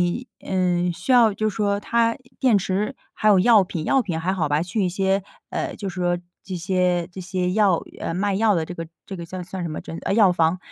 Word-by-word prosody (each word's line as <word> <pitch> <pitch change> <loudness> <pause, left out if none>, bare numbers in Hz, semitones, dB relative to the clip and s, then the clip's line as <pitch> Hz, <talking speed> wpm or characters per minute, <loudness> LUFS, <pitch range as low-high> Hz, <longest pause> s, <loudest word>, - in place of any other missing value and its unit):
你， 250 +1 -7
呃， 180 -2 0
需 260 - -1
要 230 -4 +6
就 215 +1 0
说 200 -1 0
它 230 +1 +1 0.2
电 245 -5 +4
池 195 +2 -1 0.2
还 215 - +1
有 200 -3 +6
药 215 +1 +6
品， 165 -3 -5
药 270 - +3
品 175 -8 -2
还 180 +3 -1
好 165 -6 0
吧， 145 +2 +1
去 190 +4 -2
一 - - +1
些， 195 +1 +1 0.3
呃， - - -3
就 200 -2 -4
是， 175 -1 -1 0.2
这 185 - -6
些， 180 -1 +1
这 190 - -7
些 180 0 -2
药， 200 -5 +3 0.2
呃， 165 - -3
卖 200 +1 0
药 215 0 +3
的 165 -2 0
这 180 - -7
个 165 -1 -6 0.2
这 195 - -7
个 170 -1 -7
叫 185 +1 -6
算 185 +1 -6
什 170 - -2
么 155 - -5
真 165 - -7
呃， 195 - -1
药 200 -5 +5
房， 165 +1 +2
185 Hz, 250 characters per minute, -23 LUFS, 175-205 Hz, 0.3 s, 要